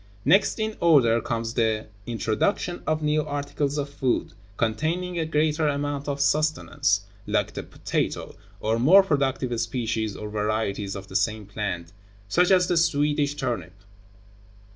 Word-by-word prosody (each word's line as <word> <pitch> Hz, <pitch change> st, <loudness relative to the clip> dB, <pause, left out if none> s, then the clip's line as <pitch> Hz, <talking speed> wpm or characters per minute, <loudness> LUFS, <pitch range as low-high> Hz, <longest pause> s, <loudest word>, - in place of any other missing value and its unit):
Next 195 Hz, -, +4 dB
in 220 Hz, 0 st, -2 dB
order 125 Hz, -9 st, +5 dB
comes 115 Hz, -1 st, -3 dB
the 110 Hz, -2 st, +1 dB, 0.2 s
introduction 120 Hz, -, -1 dB
of 155 Hz, 0 st, 0 dB
new 150 Hz, 0 st, +2 dB
articles 145 Hz, 0 st, -2 dB
of 145 Hz, -1 st, -1 dB
food, 140 Hz, -3 st, -1 dB, 0.2 s
containing 165 Hz, +10 st, -1 dB
a 160 Hz, -, -1 dB
greater 155 Hz, 0 st, +1 dB
amount 145 Hz, 0 st, -2 dB
of 140 Hz, -1 st, -2 dB
sustenance, 140 Hz, -6 st, +1 dB, 0.3 s
like -, -, 0 dB
the -, -, -4 dB
potato, -, -, -3 dB, 0.3 s
or 110 Hz, +1 st, 0 dB
more 180 Hz, +11 st, +7 dB
productive 135 Hz, -7 st, 0 dB
species 115 Hz, -3 st, -2 dB
or 105 Hz, -, -6 dB
varieties 105 Hz, -1 st, -2 dB
of 95 Hz, -1 st, -7 dB
the 95 Hz, -, -11 dB
same 105 Hz, +2 st, 0 dB
plant, 95 Hz, -4 st, -4 dB, 0.3 s
such 175 Hz, -, +3 dB
as 185 Hz, -2 st, +5 dB
the 175 Hz, -, +1 dB
Swedish 145 Hz, -2 st, +2 dB
turnip. 115 Hz, -, -3 dB
140 Hz, 140 wpm, -25 LUFS, 110-155 Hz, 0.3 s, more